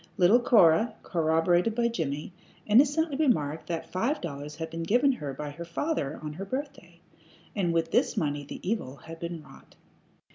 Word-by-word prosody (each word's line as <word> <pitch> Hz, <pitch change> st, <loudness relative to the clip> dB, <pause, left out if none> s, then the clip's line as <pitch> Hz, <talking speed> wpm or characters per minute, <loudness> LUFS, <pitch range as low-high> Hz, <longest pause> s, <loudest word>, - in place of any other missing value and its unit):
Little 190 Hz, +6 st, +6 dB
Cora, 220 Hz, -2 st, +4 dB
corroborated 175 Hz, +5 st, +2 dB
by 235 Hz, 0 st, +2 dB
Jimmie, 155 Hz, -7 st, -3 dB, 0.3 s
innocently 290 Hz, +7 st, +4 dB
remarked 160 Hz, -, +1 dB
that 165 Hz, -2 st, -4 dB
five 235 Hz, +11 st, 0 dB
dollars 145 Hz, -2 st, -6 dB
had 160 Hz, 0 st, -6 dB
been 165 Hz, 0 st, -4 dB
given 245 Hz, +11 st, +3 dB
her 150 Hz, -, -4 dB
by 145 Hz, +2 st, -6 dB
her 170 Hz, +4 st, -8 dB
father 170 Hz, -, -2 dB
on 150 Hz, -1 st, -5 dB
her 190 Hz, +6 st, -6 dB
birthday, 275 Hz, +7 st, -6 dB, 0.6 s
and 185 Hz, -5 st, +1 dB
with 165 Hz, -1 st, 0 dB
this 240 Hz, -1 st, +2 dB
money 145 Hz, -5 st, -1 dB
the 145 Hz, -, -9 dB
evil 185 Hz, -, -2 dB
had 165 Hz, +3 st, -11 dB
been 170 Hz, -2 st, -5 dB
wrought. -, -, -17 dB
170 Hz, 170 wpm, -28 LUFS, 155-235 Hz, 0.6 s, Little